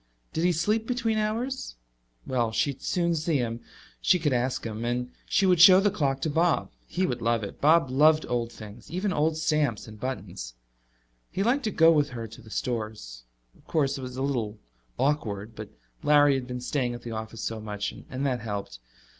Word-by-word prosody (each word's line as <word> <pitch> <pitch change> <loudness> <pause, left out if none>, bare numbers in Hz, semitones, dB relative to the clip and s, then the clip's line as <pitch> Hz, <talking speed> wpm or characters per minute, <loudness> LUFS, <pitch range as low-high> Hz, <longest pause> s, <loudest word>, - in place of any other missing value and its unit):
Did 160 - -1
he 180 - +4
sleep 210 +7 0
between 230 -3 0
hours? 230 - -2 0.5
Well, 120 -3 0
she 140 +6 +1
would 135 - -13
soon 170 -1 +1
see 160 -1 +1
him: 115 -2 -2 0.4
she 185 - +4
could 155 -5 0
ask 125 +1 -1
him. 110 0 -4
And 125 +1 -2 0.2
she 195 - +3
would 180 -3 +4
show 185 0 +10
the 205 +1 +2
clock 140 -8 0
to 160 - 0
Bob. 165 +2 +1 0.2
He 185 +1 0
would 125 -7 -2
love 115 -1 +1
it; 100 - -7
Bob 155 -2 +4
loved 155 +3 +5
old 120 -1 -1
things, 110 0 -11
even 185 +3 -1
old 155 0 +1
stamps 150 -9 0
and 110 -1 -11
buttons. 95 - -5 0.7
He 195 - -1
liked 255 +5 +1
to 215 - 0
go 165 -2 +6
with 145 -2 +3
her 115 -3 -6
to 115 +3 -13
the 110 - -15
stores. 110 - -4 0.3
Of - - -25
course, 140 -3 +1
it - - -6
was 125 0 -7
a 130 - -1
little 115 -6 -1 0.4
awkward, 110 -7 -1
but 110 -1 -7 0.3
Larry 145 -2 +5
had 130 -2 -2
been 125 0 -5
staying 125 -2 -1
at 120 - -10
the 120 - -6
office 110 0 -6
so 115 -1 -3
much, 105 -1 -4 0.2
and 135 +2 -3
that 130 -3 0
helped. 100 - -5
135 Hz, 205 wpm, -27 LUFS, 115-165 Hz, 0.7 s, show